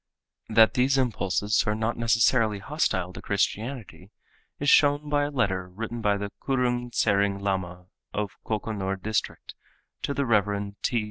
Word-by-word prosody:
That 110 0 +5
these 130 +2 +2
impulses 105 -4 +1
are 105 - +1
not 110 +2 -1
necessarily 115 -1 +2
hostile 95 - -1
to - - -8
Christianity 100 -3 -3 0.5
is 145 - -3
shown 145 +1 +4
by 145 0 +2
a - - -3
letter 95 -10 -1
written 115 +5 -6
by 105 -1 +2
the 100 0 -5
Kurung 125 -2 0
Tsering 100 -3 +1
Lama 90 -3 -3 0.3
of 105 -2 -2
Kokonor 105 -3 -2
district 110 +2 -3 0.5
to 140 - -2
the 140 - 0
Rev. 100 -3 +1
T. 120 - +1
110 Hz, 145 wpm, -26 LUFS, 100-125 Hz, 0.5 s, That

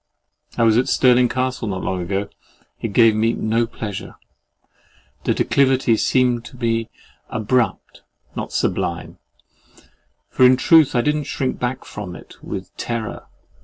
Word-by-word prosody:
I 115 - +2
was 115 0 +4
at 125 - 0
Stirling 125 -1 +4
Castle 130 -1 -2
not 95 -2 -3
long 95 -1 -2
ago. 95 +3 -2 0.5
It - - -1
gave 115 +1 +5
me 115 +2 +2
no 115 +1 0
pleasure. 105 -4 -7 1.1
The - - +1
declivity 130 -3 +2
seemed 125 0 +1
to 125 - -12
me 115 -2 -1 0.4
abrupt, 110 -1 -1 0.3
not - - -5
sublime; - - -2 1.1
for - - +1
in 125 0 +7
truth 155 0 +5
I 120 - +4
did 150 +4 +1
not 150 -2 -4
shrink 130 -2 -2
back 125 +1 -3
from 100 -4 -7
it - - -13
with - - -7
terror. 115 -3 -4
120 Hz, 145 wpm, -20 LUFS, 110-130 Hz, 1.1 s, in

